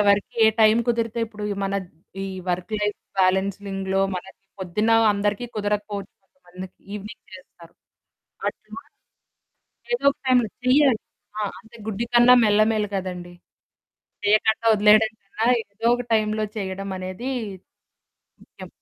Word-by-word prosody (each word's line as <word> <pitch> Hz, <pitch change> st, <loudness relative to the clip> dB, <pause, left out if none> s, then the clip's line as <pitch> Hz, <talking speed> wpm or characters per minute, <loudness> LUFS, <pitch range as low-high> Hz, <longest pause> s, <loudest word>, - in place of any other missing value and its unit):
ఎవరికి 200 Hz, 0 st, +2 dB
ఏ -, -, +7 dB
టైమ్ 220 Hz, +1 st, +6 dB
కుదిరితే 230 Hz, -1 st, -1 dB
ఇప్పుడు 210 Hz, -1 st, -8 dB, 0.2 s
మన 195 Hz, -, -2 dB, 0.5 s
ఈ 195 Hz, -, -3 dB, 0.2 s
వర్క్ 180 Hz, +4 st, -2 dB
లైఫ్ 210 Hz, 0 st, -1 dB, 0.2 s
బాలెన్సిలింగ్‌లో 195 Hz, 0 st, 0 dB
మనకి 185 Hz, +1 st, -8 dB, 0.2 s
పొద్దున్న 195 Hz, +4 st, -1 dB, 0.2 s
అందరికి 205 Hz, +2 st, -1 dB
కుదరకపోవచ్చు. 205 Hz, -1 st, -3 dB
కొంతమంది 190 Hz, -4 st, -12 dB, 0.3 s
ఈవెనింగ్ 210 Hz, +1 st, -9 dB
చేస్తారు. 175 Hz, -2 st, -16 dB, 0.7 s
అట్లా -, -, -9 dB, 1.1 s
ఏదో 480 Hz, -, -3 dB
ఒక -, -, -34 dB
టైమ్‌లో 245 Hz, -4 st, +3 dB
చెయ్యాలి. 260 Hz, -2 st, +4 dB, 0.4 s
ఆ! 215 Hz, -, -1 dB, 0.2 s
అంతే 230 Hz, 0 st, -17 dB
గుడ్డి 220 Hz, +2 st, -2 dB
కన్నా 240 Hz, +1 st, +8 dB
మెల్ల 210 Hz, 0 st, +4 dB
మేలు 210 Hz, -1 st, -1 dB
కదండీ! 180 Hz, -2 st, -5 dB, 0.9 s
చేయకండా 220 Hz, +2 st, +2 dB
వదిలేయడం 215 Hz, +1 st, +5 dB
కన్నా 210 Hz, +3 st, -3 dB, 0.2 s
ఏదో 220 Hz, +3 st, -4 dB
ఒక 245 Hz, -, -4 dB
టైమ్‌లో 215 Hz, 0 st, 0 dB
చేయడం 195 Hz, 0 st, -4 dB
అనేది 185 Hz, +8 st, -5 dB, 1.1 s
ముఖ్యం. -, -, -12 dB
210 Hz, 120 wpm, -23 LUFS, 195-220 Hz, 1.1 s, కన్నా